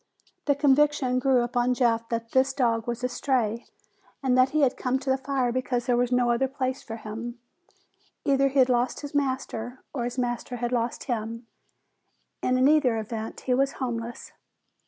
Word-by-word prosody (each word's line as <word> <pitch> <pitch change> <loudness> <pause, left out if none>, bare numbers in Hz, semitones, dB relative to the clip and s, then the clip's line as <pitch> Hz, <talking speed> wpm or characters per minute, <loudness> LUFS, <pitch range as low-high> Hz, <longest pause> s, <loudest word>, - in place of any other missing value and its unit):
The 285 - +3
conviction 280 -2 +3
grew 255 -2 +3
upon 245 +1 +1
Jeff 230 -2 +1
that 230 0 -3
this 265 +1 +3
dog 235 -3 +1
was 240 +1 -3
a - - +2
stray, 245 -3 -1 0.6
and 255 -2 +3
that 255 +1 +5
he 310 +2 +1
had 265 -3 +3
come 255 +1 0
to 265 0 -2
the 265 - +2
fire 265 -2 0
because 245 -1 -1
there 245 - +2
was 245 0 +1
no 245 -1 +3
other 250 +3 +2
place 265 0 -3
for 225 - -7
him. 230 +2 -6 0.9
Either 275 0 +3
he'd 270 -2 +4
lost 245 0 0
his 290 0 -7
master 260 -3 -2
or 245 -3 -1
the 250 - -6
master 245 0 -2
had 240 0 -2
lost 240 -1 -1
him, 230 -1 -4 1.0
and 255 0 +2
in 260 +1 +5
either 285 -6 +4
event, 220 0 -5
he 255 - 0
was 275 +2 +2
homeless. 235 -2 -5
250 Hz, 180 wpm, -26 LUFS, 235-265 Hz, 1.0 s, that